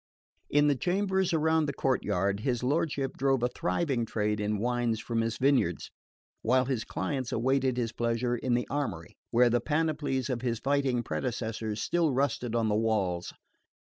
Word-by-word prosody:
In 145 0 +4
the 145 - +4
chambers 190 +4 0
around 160 -1 +2
the 140 - -2
courtyard 100 -7 0
his 120 +1 -1
lordship 140 0 0
drove 135 -2 +2
a 125 - +2
thriving 125 - -1
trade 105 -1 -1
in 105 0 0
wines 120 0 0
from 115 0 -1
his 115 0 -2
vineyards, 130 - +1 0.5
while 130 +3 +3
his 125 -4 -1
clients 130 +6 -3
awaited 130 +1 +1
his 115 -2 -1
pleasure 120 +1 0
in 120 +1 0
the 120 - -1
armoury, 115 - -3
where 120 0 +4
the 120 - +2
panoplies 150 -4 0
of 125 -4 -2
his 120 -2 -1
fighting 135 -1 +1
predecessors 110 -4 -3
still 170 -3 +1
rusted 125 -3 0
on 115 -1 +2
the 105 - +1
walls. 100 -6 0
125 Hz, 165 wpm, -29 LUFS, 115-140 Hz, 0.5 s, In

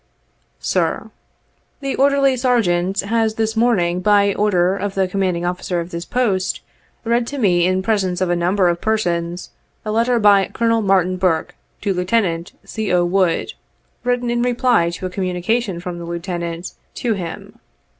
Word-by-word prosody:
"Sir: - - -1 0.7
"The 275 -1 -3
Orderly 275 -1 +3
Sergeant 195 -7 +1
has 220 +1 0
this 220 0 -1
morning, 195 -7 +2
by 200 0 +4
order 190 -3 +2
of 200 0 -4
the 190 -1 +1
Commanding 185 -2 -1
Officer 180 0 -2
of 170 +1 -6
this 170 +1 -5
Post, 205 -7 0 0.4
read 235 0 +1
to 285 - -5
me 180 -7 +3
in 185 0 0
presence 195 -4 0
of 185 - +1
a - - +2
number 180 +2 +2
of 170 0 0
persons, 175 -5 -1 0.3
a 215 - -2
letter 235 +2 +2
from 200 -2 +5
Colonel 230 -1 +1
Martin 185 -2 +2
Burke 180 -4 0 0.3
to 200 - 0
Lieutenant 180 -2 0
C. 220 -1 -4
0. 180 -1 +2
Wood, 180 -1 +1 0.5
written 245 -1 0
in 240 0 0
reply 245 -7 +2
to 170 +2 -6
a - - -2
communication 185 +2 -1
from 175 0 -6
the 170 - -7
Lieutenant 170 0 -5 0.2
to 235 -3 0
him. 200 +4 -7
195 Hz, 160 wpm, -19 LUFS, 175-225 Hz, 0.7 s, from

